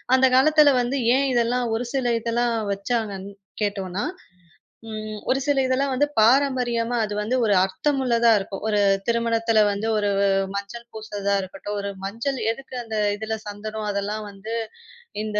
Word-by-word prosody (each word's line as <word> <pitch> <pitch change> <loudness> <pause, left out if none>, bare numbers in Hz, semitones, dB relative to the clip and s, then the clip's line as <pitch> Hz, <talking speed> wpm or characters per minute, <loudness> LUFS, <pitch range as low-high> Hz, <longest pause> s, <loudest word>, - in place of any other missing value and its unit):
அந்தக் 260 -1 +4
காலத்துல 300 0 +6
வந்து 250 +3 -1 0.2
ஏன் 275 0 +1
இதெல்லாம் 240 +1 +1
ஒரு 240 +1 -3
சில 245 -3 +1
இதெல்லாம் 235 0 0 0.2
வச்சாங்கன்னு 200 -2 -3 0.3
கேட்டோனா, 195 -1 -2 0.9
ம். 215 -1 -6
ஒரு 265 +1 +3
சில 285 -2 +2
இதுலாம் 270 +1 +1
வந்து 290 +3 +2
பாரம்பரியமா, 245 -1 +3
அது 210 - -5
வந்து 220 +5 -1
ஒரு 205 - +3
அர்த்தமுள்ளதா 235 +1 +2
இருக்கும். 195 0 -6
ஒரு 210 -1 +2 0.3
திருமணத்துல 230 -1 +2
வந்து 205 +2 -2
ஒரு 205 -1 +1 0.5
மஞ்சள் 200 +4 -6
பூசுறதா 205 -2 -3
இருக்கட்டும், 195 +2 -6
ஒரு 200 - -3
மஞ்சள் 230 +7 -3
எதுக்கு 260 +1 -9
அந்த 220 -1 -4 0.2
இதுல 220 +1 -3
சந்தனம், 215 +1 -5
அதெல்லாம் 205 +2 -3
வந்து 200 +3 -8 0.7
இந்த 210 -1 -1
225 Hz, 145 wpm, -23 LUFS, 205-250 Hz, 0.9 s, காலத்துல